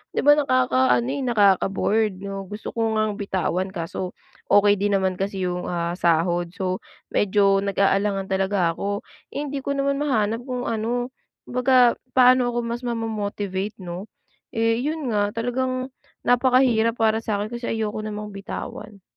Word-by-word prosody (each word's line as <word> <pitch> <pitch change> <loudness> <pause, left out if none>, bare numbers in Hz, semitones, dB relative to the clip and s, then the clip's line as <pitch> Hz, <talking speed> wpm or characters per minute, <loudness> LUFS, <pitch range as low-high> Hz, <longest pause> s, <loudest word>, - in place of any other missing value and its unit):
‘di - - +2
ba 290 +1 +7
nakakaano 255 -2 +2
eh 280 - -2
nakaka-bored 205 -2 +2
'no. 195 0 -5
Gusto 210 +3 -6
ko 225 -1 0
ngang 215 -1 0
bitawan 190 -1 -1
kaso 180 +1 -4 0.4
okey 205 0 +6
din 205 +1 0
naman 190 -2 +1
kasi 195 0 -3
yung, 180 0 -3
ah, 170 0 -2
sahod. 175 0 +2
So, 185 -1 -2 0.3
medyo 200 -1 +3
nag-aalangan 195 0 +1
talaga 190 -2 +1
ako. 200 +1 -2 0.3
Eh, - - -2
hindi 285 -1 -4
ko 280 - 0
naman 280 0 0
mahanap 230 -5 0
kung 250 -2 -3
ano, 235 +2 -1 0.4
kumbaga 250 -1 +4 0.2
paano 250 -1 +5
ako 240 - 0
mas 235 +1 -4
mamo-motivate 205 -3 -3
'no, 180 +2 -6 0.5
eh 225 0 +2
yon 295 +2 -2
nga 205 -2 0
talagang 255 +2 -2 0.3
napakahirap 245 -2 +3
para 220 -2 +2
sakin 210 -2 -2
kasi 240 +1 -6
ayoko 220 -2 -2
namang 210 0 -5
bitawan. 200 0 -7
215 Hz, 145 wpm, -23 LUFS, 195-245 Hz, 0.5 s, ba